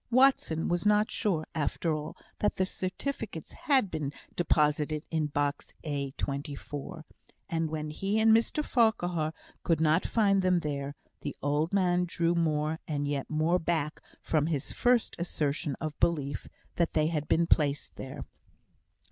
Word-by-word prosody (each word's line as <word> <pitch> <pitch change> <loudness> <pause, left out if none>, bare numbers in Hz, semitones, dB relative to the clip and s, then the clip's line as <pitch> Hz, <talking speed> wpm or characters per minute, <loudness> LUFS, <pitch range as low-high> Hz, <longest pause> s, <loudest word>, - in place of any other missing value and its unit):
Watson 250 - +4
was 175 0 0
not 210 +2 +3
sure, 175 -8 0
after 160 +2 0
all, 155 0 -5 0.2
that 210 - +1
the 185 - +1
certificates 190 - -4
had 265 -9 +2
been 150 -3 -2 0.2
deposited 150 -2 +2
in 160 -2 +1
box 145 0 -2
A, 140 -3 -2
24; 145 +4 -5 0.4
and 165 -1 -1
when 155 -1 -3
he 195 +7 0
and 220 0 +6
Mr 265 +6 +1
Farquhar 180 -10 +2 0.3
could 165 -3 +1
not 160 +2 +3
find 200 -4 +3
them 180 -2 +3
there, 140 -2 -3 0.2
the 145 - -5
old 145 +3 +1
man 180 -2 +2
drew 170 0 +1
more 155 -1 +1
and 145 -2 -1
yet 145 -2 -2
more 160 +3 +2
back 160 -3 -1 0.2
from 155 -1 +1
his 150 -5 -1
first 245 -1 +2
assertion 150 -4 -1
of 155 -2 -4
belief 145 -5 0 0.3
that 170 -1 +1
they 155 -1 +3
had 155 -2 -1
been 170 - +3
placed 145 -3 +1
there. 130 - -7
160 Hz, 150 wpm, -30 LUFS, 150-185 Hz, 0.4 s, and